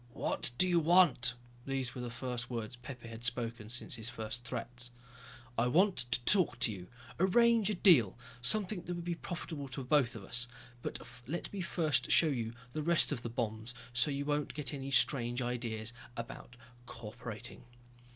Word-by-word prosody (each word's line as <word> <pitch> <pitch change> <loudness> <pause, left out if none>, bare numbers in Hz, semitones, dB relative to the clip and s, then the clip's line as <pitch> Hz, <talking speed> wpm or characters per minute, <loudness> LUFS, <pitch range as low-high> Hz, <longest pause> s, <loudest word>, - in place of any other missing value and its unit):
"What - - -1
do 185 - +5
you 175 -1 +4
want?" 170 -7 +4 0.3
These 135 -3 -1
were 125 - -6
the 120 - -4
first 125 0 -4
words 115 -1 -4
Pepe 120 -1 -9
had 115 0 -9
spoken 115 -3 -2
since 120 0 -2
his 110 0 -3
first 115 +1 -5
threats. 120 0 -4 0.7
"I 120 - +3
want 185 +9 +4 0.2
to - - +3
talk 190 -5 +5
to 110 - +4
you, 90 -2 -9 0.3
arrange 225 +3 +4
a 210 - 0
deal. 150 - +5 0.2
Something 200 +7 +3
that 175 - -5
would 170 0 -6
be 175 - -1
profitable 165 -4 -6
for 135 +1 -6
both 125 -2 +2
of 110 - -8
us. 125 +5 -2 0.3
But - - -5 0.2
let 170 +8 -4
me 200 - -3
first 170 -3 0
show 160 - +6
you 115 -5 -2 0.2
the 155 - -2
rest 170 +2 +4
of 120 - -2
the 120 - -4
bombs, 115 0 -3 0.2
so 125 +4 +3
you 140 0 -2
won't 145 0 -1
get 145 -3 -1
any 135 -1 -5
strange 125 -2 +4
ideas 120 -2 -2 0.2
about 120 +1 -8 0.3
co 115 -2 -8
operating." 115 +1 -9
125 Hz, 180 wpm, -33 LUFS, 120-165 Hz, 0.7 s, show